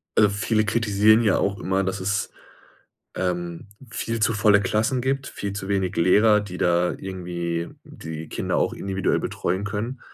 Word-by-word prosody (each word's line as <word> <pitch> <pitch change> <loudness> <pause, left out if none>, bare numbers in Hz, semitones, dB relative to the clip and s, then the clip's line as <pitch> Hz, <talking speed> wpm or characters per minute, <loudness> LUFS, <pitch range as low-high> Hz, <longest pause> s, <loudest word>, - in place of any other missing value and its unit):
also 105 -1 +5
viele 110 +2 0
kritisieren 110 +1 +4
ja 105 -4 +3
auch 100 0 -1
immer, 95 +1 0
dass 95 +1 -2
es, 100 +2 -1 0.8
ähm, 85 0 -3 0.2
viel 115 0 -3
zu 110 - +3
volle 105 -1 +4
Klassen 110 +6 0
gibt, 135 +2 -1
viel 100 -1 -5
zu 100 -1 -5
wenig 95 -1 -1
Lehrer, 105 +5 +5
die 90 -3 -7
da 90 0 +2
irgendwie 85 -3 -4 0.2
die 80 0 -8
Kinder - - -2
auch - - +1
individuell 95 -1 -1
betreuen 95 +3 -2
können. 105 +6 -4
100 Hz, 160 wpm, -24 LUFS, 90-105 Hz, 0.8 s, also